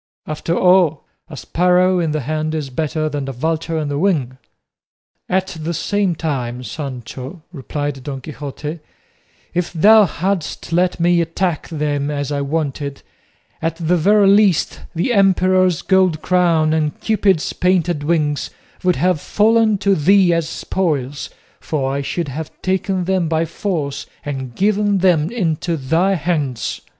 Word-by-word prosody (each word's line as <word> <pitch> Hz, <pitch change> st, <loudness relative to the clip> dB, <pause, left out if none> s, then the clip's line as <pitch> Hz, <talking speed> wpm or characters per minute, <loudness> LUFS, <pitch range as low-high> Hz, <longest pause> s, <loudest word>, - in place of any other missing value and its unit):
After 155 Hz, +2 st, -2 dB
all, 180 Hz, -5 st, +4 dB, 0.3 s
'a 150 Hz, -, -9 dB
sparrow 180 Hz, +4 st, +2 dB
in 165 Hz, -2 st, 0 dB
the 155 Hz, 0 st, -1 dB
hand 155 Hz, +3 st, -2 dB
is 145 Hz, -4 st, -4 dB
better 155 Hz, +3 st, -1 dB
than 145 Hz, -2 st, -3 dB
a -, -, -2 dB
vulture 160 Hz, +5 st, -2 dB
on 155 Hz, -2 st, -2 dB
the 145 Hz, 0 st, -2 dB
wing.'" 145 Hz, -9 st, 0 dB, 0.9 s
"At 190 Hz, 0 st, 0 dB
the 165 Hz, +2 st, -3 dB
same 200 Hz, 0 st, 0 dB
time, 125 Hz, -6 st, -3 dB
Sancho," 135 Hz, +3 st, -7 dB
replied 145 Hz, -1 st, -4 dB
Don 135 Hz, -1 st, -5 dB
Quixote, 145 Hz, +3 st, -7 dB, 0.7 s
"if 175 Hz, 0 st, -1 dB
thou 210 Hz, +6 st, +6 dB
hadst 180 Hz, -1 st, -3 dB
let 180 Hz, +1 st, +1 dB
me 170 Hz, 0 st, +3 dB
attack 165 Hz, 0 st, -2 dB
them 145 Hz, -3 st, -2 dB
as 145 Hz, -1 st, -3 dB
I 140 Hz, -1 st, -1 dB
wanted, 140 Hz, -1 st, -3 dB, 0.6 s
at 165 Hz, 0 st, -1 dB
the 170 Hz, +1 st, 0 dB
very 200 Hz, +4 st, +4 dB
least 200 Hz, -3 st, +3 dB, 0.2 s
the 180 Hz, +10 st, 0 dB
emperor's 185 Hz, -3 st, +3 dB
gold 185 Hz, -4 st, +2 dB
crown 170 Hz, -4 st, +2 dB
and 155 Hz, -2 st, -1 dB
Cupid's 200 Hz, -6 st, +1 dB
painted 175 Hz, -4 st, +1 dB
wings 150 Hz, -2 st, 0 dB, 0.3 s
would 180 Hz, -1 st, +3 dB
have 180 Hz, -4 st, +1 dB
fallen 220 Hz, 0 st, +3 dB
to 200 Hz, +1 st, +2 dB
thee 185 Hz, +2 st, +4 dB
as 165 Hz, -1 st, -1 dB
spoils, 145 Hz, -9 st, -2 dB, 0.3 s
for 135 Hz, -3 st, -2 dB
I 140 Hz, -, -1 dB
should 155 Hz, +2 st, -3 dB
have 150 Hz, +3 st, -5 dB
taken 190 Hz, 0 st, 0 dB
them 185 Hz, -1 st, 0 dB
by 160 Hz, 0 st, +1 dB
force 160 Hz, -5 st, -3 dB, 0.2 s
and 130 Hz, -4 st, -5 dB
given 205 Hz, 0 st, +2 dB
them 175 Hz, -5 st, +3 dB
into 170 Hz, -6 st, -1 dB
thy 165 Hz, +8 st, +1 dB
hands." 150 Hz, -, -2 dB
165 Hz, 145 wpm, -19 LUFS, 145-185 Hz, 0.9 s, thou